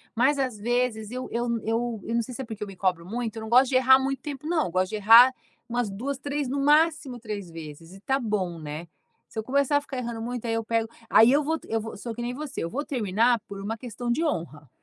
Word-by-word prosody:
mas 265 +5 +3
às 255 -5 -1
vezes 235 -1 0
eu 255 +2 -5
eu 235 +1 -1
n 230 -2 -1
eu 225 0 -1
eu 230 - -3
não 235 - +3
sei 245 +2 -7
se 265 - -5
é - - -5
porque 220 -2 -8
eu 210 - -6
me 195 - -10
cobro 180 -2 0
muito, 225 +2 -4
eu - - -5
não 220 - -6
gosto 255 +2 +6
de 260 - 0
errar 260 +1 +7
muito 270 0 -2
tempo 295 -1 -7
não, 325 - +1
gosto 185 +2 0
de 215 - -4
errar 230 +5 +8 0.4
umas 240 -2 -1
2, 255 +8 -4
3, 285 0 -3
no 280 - -1
máximo 300 -2 +3
3 210 -5 -6
vezes 165 +1 -10
e 195 - -12
tá 270 +5 0
bom, 195 -8 -2
né. 155 +2 -6 0.4
Se - - -5
eu 220 - -3
começar 280 +3 +2
a 285 - 0
ficar 275 -2 -7
errando 235 -2 -4
muito, 245 +1 -4
aí 230 - -1
eu 225 0 -1
pego 225 0 0 0.2
aí 225 +3 +7
eu 290 +1 +3
vou 320 +2 0
t - - -16
eu 225 - +1
vou 225 - -7
sou 230 +3 -6
que 240 - -6
nem 240 +1 -3
você, 290 -1 -5
eu 165 - -3
vou 285 - -3
terminar 230 -1 +2
por 200 -2 -8
uma 220 +3 -3
questão 240 0 -4
de 310 +7 +1
honra. 160 - -3
235 Hz, 270 wpm, -26 LUFS, 210-265 Hz, 0.4 s, errar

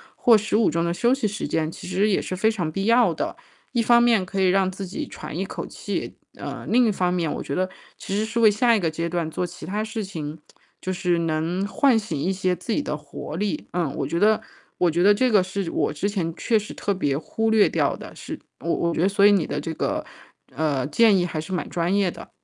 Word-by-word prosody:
或 235 -2 +5
15 215 +1 +2
钟 165 +1 0
的 170 - 0
休 235 +7 +2
息 265 -6 0
时 210 +1 -4
间。 160 0 -1
其 - - -10
实 190 +3 +1
也 195 - +2
是 185 - -4
非 220 +4 +2
常 175 -7 -2
必 195 +4 -2
要 235 +1 +5
的， - - -3 0.4
一 240 - +1
方 235 +1 +5
面 230 -5 +4
可 195 +1 -4
以 185 - +4
让 190 0 +3
自 190 +1 -6
己 280 - -5
喘 - - -8
一 - - -1
口 - - -6
气 - - -5 0.2
呃， - - -7
另 245 +1 +4
一 220 - +3
方 180 -2 0
面 170 -4 0
我 - - -4
觉 - - -5
得 185 0 +1 0.3
其 195 - -4
实 215 - +1
是 225 +1 -2
为 220 -2 +7
下 235 +3 +3
一 215 - +1
个 170 - 0
阶 165 +1 -2
段 170 -2 -1
做 180 - -2
其 175 0 -9
他 210 +3 -1
事 220 0 -4
情， 160 -5 -6 0.4
就 185 - -3
是 175 -1 +1
能 165 +4 -1
唤 260 +3 +3
醒 205 -9 -3
一 175 +7 0
些 185 -1 0
自 180 +7 -6
己 295 - +1
的 150 - -2
活 150 +1 -8
力。 205 0 -2
嗯， 165 -6 -1
我 - - -2
觉 170 - -1
得 215 +2 +4 0.4
我 175 - +4
觉 170 +2 0
得 205 +2 +7
这 255 +3 +2
个 205 - +6
是 190 -1 -3
我 - - 0
之 170 +7 -1
前 170 -5 -2
确 225 -3 +1
实 210 - -8
特 200 - -1
别 145 -7 0
忽 225 +8 -1
略 220 -2 +5
掉 - - +1
的， - - -11
是 - - -7 0.2
我 170 - -4
我 170 - 0
觉 - - -1
得 190 - +4
所 200 0 +4
以 - - +6
你 190 -6 +3
的 145 - -2
这 165 - -4
个 - - -2 0.5
呃， 145 -4 0
建 210 +5 +5
议 175 - +1
还 160 -3 -3
是 160 - -9
蛮 180 - -2
专 175 +3 0
业 195 -4 +2
的。 - - -11
190 Hz, 275 characters per minute, -24 LUFS, 170-215 Hz, 0.5 s, 为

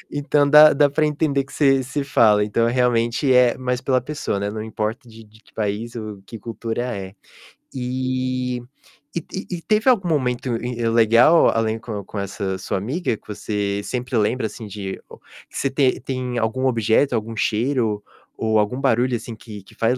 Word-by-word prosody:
então, 145 0 +1
dá 150 +1 +9
dá 145 0 +3
para 155 +2 +1
entender 145 -2 0
que 135 - -16
você 135 -2 +3
você 140 +3 -3
fala, 110 -7 +4
então, 110 +2 +1
realmente, 120 +1 +1
é 125 -1 +5
mais 125 -1 -2
pela 130 -2 +1
pessoa, 150 -9 -3
né, 100 +1 -2
não 110 +1 -5
importa 110 +3 -4
de 115 0 -13
de 110 +1 -21
que - - -26
país 110 +3 -3
ou 110 -3 -7
que 115 - -8
cultura 115 +2 -4
é. 95 0 -7 0.6
E 130 0 -2 0.6
e 170 - +1
e 190 - -5
e - - -10
teve 215 +7 +2
algum 205 -8 +3
momento 130 -4 0
in 125 0 -3
legal, 115 +8 +5
além, 115 0 0
com 110 -3 -6
com 100 +1 -7
essa 100 -1 -3
sua 95 - -3
amiga, 125 - -2
que - - -29
você 100 -1 -2
sempre 125 +2 -4
lembra, 110 +2 +1
assim, 110 -1 -9
de 100 -2 -6
ou - - -12 0.3
que - - -9
você 135 - 0
te 135 -1 +1
tem 130 -1 -4
algum 120 +4 0
objeto, 115 +2 +2
algum 115 0 -3
cheiro 115 -3 0 0.3
ou 110 -1 +1
algum 105 +6 -1
barulho, 125 -1 +2
assim, 115 0 -6
que 105 -3 -11
que - - -19
faz 115 +3 +1
120 Hz, 190 wpm, -21 LUFS, 110-130 Hz, 0.6 s, dá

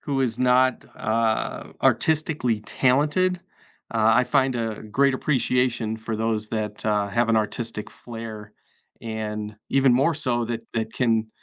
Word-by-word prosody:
who 140 -2 -2
is 125 -3 0
not, 125 0 +3
uh, 110 0 -1
artistically 155 -8 +2
talented, 150 +11 +1 0.5
uh, 110 -1 +4
I 125 - +4
find 135 -2 +2
a 115 -2 -3
great 135 +6 +2
appreciation 125 -4 0
for 110 0 -4
those 110 -1 -1
that, 105 -2 -3
uh, 105 -1 +1
have 115 +3 +1
an 115 - +3
artistic 110 0 -2
flair, 110 -3 -9 0.5
and 105 -1 -4 0.2
even 135 -1 +4
more 135 +6 +3
so 125 -5 0
that 115 -1 -3
that 110 -1 -2
can 115 -3 +1
115 Hz, 140 wpm, -24 LUFS, 110-130 Hz, 0.5 s, uh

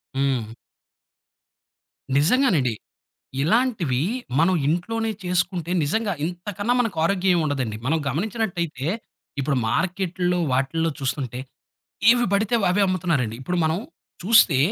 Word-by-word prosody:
హ్మ్. 130 -5 -1 1.6
నిజంగానండి. 160 - +3 0.7
ఇలాంటివి 180 - +1 0.4
మనం 170 +4 +4
ఇంట్లోనే 225 +8 -1
చేసుకుంటే 175 -1 -1
నిజంగా 215 +7 0
ఇంతకన్నా 205 +6 -2
మనకారోగ్య 185 -3 +1
ఏముండదండి. 135 -9 -1
మనం 160 +3 +2
గమనించినట్టయితే 170 - -2 0.5
ఇప్పుడు 140 +1 0
మార్కెట్‌లో 180 - 0
వాటిల్లో 150 +6 0
చూస్తుంటే. 130 -2 -3 0.7
ఏవి 240 0 +4
పడితే 205 +3 +1 0.2
అవే 200 +3 +2
అమ్ముతున్నారండి. 160 -11 0
ఇప్పుడు 180 +6 -2
మనం 160 +2 +1 0.4
చూస్తే 200 - +5
175 Hz, 95 wpm, -23 LUFS, 140-200 Hz, 1.6 s, చూస్తే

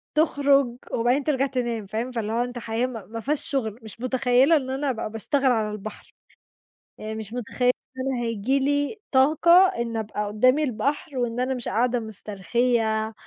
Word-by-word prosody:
تخرُج 280 -5 +3
وبعدين 245 +5 +1
ترجَع 275 -2 +1
تنام، 240 -5 -2
فاهم؟ 225 +5 -3
فاللي 220 -3 -3
هو 235 +1 +1
أنت 245 0 -6
حياة 230 +2 -1
م 255 - -8 0.2
مافيهاش 250 +6 -2
شُغل، 230 -5 -2
مش 220 +1 -9
مُتخيّلة 255 +3 +3
إن 260 -3 -4
أنا 270 +1 -1
ابقى 225 -3 -3
باشتغل 260 +5 +1
على 220 -3 0
البحر، 210 0 -9 0.8
يعني 215 0 -6
مش 220 0 -7
مُتخيلة 250 +1 +1 0.3
إن 265 0 -1
هييجي 230 +4 0
لي 285 +9 0
طاقة 290 +5 +4 0.2
إني 230 -1 -2
ابقى 210 -1 -3
قُدّامي 255 +8 +3
البحر 275 +4 -2
وإن 240 -1 -1
أنا 255 +1 0
مش 245 -2 -5
قاعدة 245 +1 +1
مسترخيّة 220 +1 -1
أ 225 - -15
245 Hz, 165 wpm, -25 LUFS, 220-270 Hz, 0.8 s, طاقة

